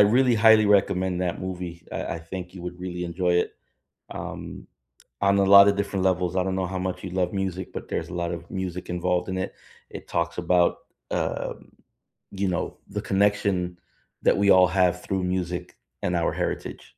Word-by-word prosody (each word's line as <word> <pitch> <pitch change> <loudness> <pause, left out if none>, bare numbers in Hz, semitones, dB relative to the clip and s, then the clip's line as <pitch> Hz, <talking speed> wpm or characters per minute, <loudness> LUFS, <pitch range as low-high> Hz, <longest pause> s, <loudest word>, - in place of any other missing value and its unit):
really 120 +4 +5
highly 110 -1 +6
recommend 95 -3 +2
that 90 -2 -2
movie. 90 -2 -6
I - - -3
I - - -6
think 90 +2 -8
you 90 - -9
would 90 0 -6
really 90 -1 -4
enjoy 90 +1 0
it, 90 - +1 0.6
um, - - -7 0.5
on 100 0 +3
a 100 - +4
lot 100 +1 +9
of 100 - +2
different 100 -1 -1
levels, 90 -1 +1
I 95 - +3
don't 95 0 -1
know 95 - 0
how 95 +1 -4
much 95 0 -3
you 95 - -4
love 90 -1 0
music, 95 -2 -3
but - - -7
there's - - -3
a - - -6
lot 85 -1 -2
of 85 0 -7
music 90 -2 -4
involved 90 +1 0
in 95 - -2
it. 95 - -3 0.4
It - - -9
talks 85 0 -1
about, 90 0 +3 0.3
um, - - -3 0.6
you 100 0 -1
know, 90 - -2
the - - -3
connection 100 -3 +1 0.4
that - - +4
we 100 0 +4
all 95 -1 +7
have 90 -1 +2
through 95 -2 -2
music 90 -1 -3 0.3
and 90 - 0
our 85 - +1
heritage. - - -3
90 Hz, 190 wpm, -25 LUFS, 90-95 Hz, 0.6 s, lot